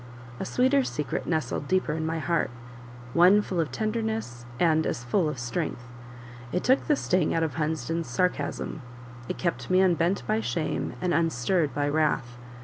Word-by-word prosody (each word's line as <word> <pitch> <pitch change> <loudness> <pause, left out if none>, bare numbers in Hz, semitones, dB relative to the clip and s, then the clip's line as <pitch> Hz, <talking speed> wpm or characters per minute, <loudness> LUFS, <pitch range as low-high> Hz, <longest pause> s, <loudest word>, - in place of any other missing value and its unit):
A - - -3
sweeter 260 +2 +3
secret 150 - -3
nestled 155 -3 -1
deeper 185 -3 +1
in 160 0 -2
my 165 +1 -1
heart; 170 +1 0 0.6
one 180 +4 +6
full 185 -4 -3
of 160 -3 0
tenderness 220 - -3
and 160 -2 +3
as 120 - -3
full 155 +7 +1
of 150 - -5
strength: 120 0 -3 0.7
it 180 - -1
took 260 +2 +3
the 300 - +4
sting 185 - +1
out 165 - +2
of 160 -4 -1
Hunsden's 160 +2 -2
sarcasm; 145 +2 -1 0.5
it - - -3
kept 170 -2 -2
me 185 0 +4
unbent 175 -2 +2
by 110 - +1
shame, 120 +8 -2
and 180 -1 +1
unstirred 165 0 +1
by 145 0 +1
wrath. 145 -5 0
160 Hz, 165 wpm, -27 LUFS, 145-185 Hz, 0.7 s, one